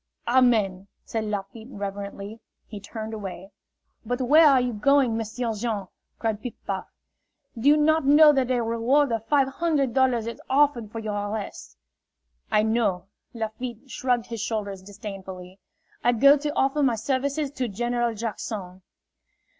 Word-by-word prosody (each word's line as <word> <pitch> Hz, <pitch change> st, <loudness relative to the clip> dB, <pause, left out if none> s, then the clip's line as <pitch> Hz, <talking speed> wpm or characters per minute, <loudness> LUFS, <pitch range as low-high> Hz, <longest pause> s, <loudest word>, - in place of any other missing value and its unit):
"Amen!" 220 Hz, -7 st, +3 dB, 0.2 s
said 220 Hz, -1 st, -3 dB
Lafitte, 210 Hz, +2 st, -5 dB
reverently. 200 Hz, 0 st, -6 dB, 0.3 s
He 210 Hz, -, -8 dB
turned 220 Hz, +2 st, -7 dB
away. 195 Hz, -2 st, -7 dB, 0.5 s
"But 245 Hz, +3 st, -2 dB
where 300 Hz, +5 st, +6 dB
are 275 Hz, -3 st, +6 dB
you 250 Hz, -1 st, -1 dB
going, 260 Hz, +1 st, +3 dB
M'sieu' 225 Hz, +1 st, -3 dB
Jean?" 210 Hz, -3 st, -3 dB, 0.3 s
cried 220 Hz, -2 st, -2 dB
Piff 245 Hz, -, -6 dB
Paff. -, -, -3 dB, 0.7 s
"Do 235 Hz, +5 st, +2 dB
you 300 Hz, -, +6 dB
not 315 Hz, 0 st, +3 dB
know 300 Hz, +1 st, +8 dB
that 265 Hz, -3 st, +1 dB
a 245 Hz, -2 st, +1 dB
reward 235 Hz, +5 st, +2 dB
of 225 Hz, -1 st, -2 dB
five 280 Hz, -3 st, +3 dB
hundred 280 Hz, -3 st, 0 dB
dollars 255 Hz, -4 st, +2 dB
is 230 Hz, -, -6 dB
offered 265 Hz, -6 st, +2 dB
for 225 Hz, -, -7 dB
your 215 Hz, -2 st, -3 dB
arrest?" 210 Hz, -1 st, -6 dB, 0.7 s
"I 210 Hz, -, +3 dB
know." 220 Hz, -5 st, +1 dB, 0.3 s
Lafitte 235 Hz, +3 st, -6 dB
shrugged 245 Hz, -2 st, 0 dB
his 230 Hz, -3 st, -6 dB
shoulders 210 Hz, -4 st, -3 dB
disdainfully. 190 Hz, -2 st, -9 dB, 0.4 s
"I 245 Hz, -, +4 dB
go 275 Hz, +5 st, +7 dB
to 295 Hz, +1 st, -2 dB
offer 270 Hz, +2 st, +1 dB
my 255 Hz, -4 st, +3 dB
services 275 Hz, +4 st, -1 dB
to 255 Hz, -3 st, -2 dB
General 240 Hz, +2 st, -1 dB
Jackson." 205 Hz, -4 st, -5 dB
230 Hz, 150 wpm, -25 LUFS, 210-265 Hz, 0.7 s, know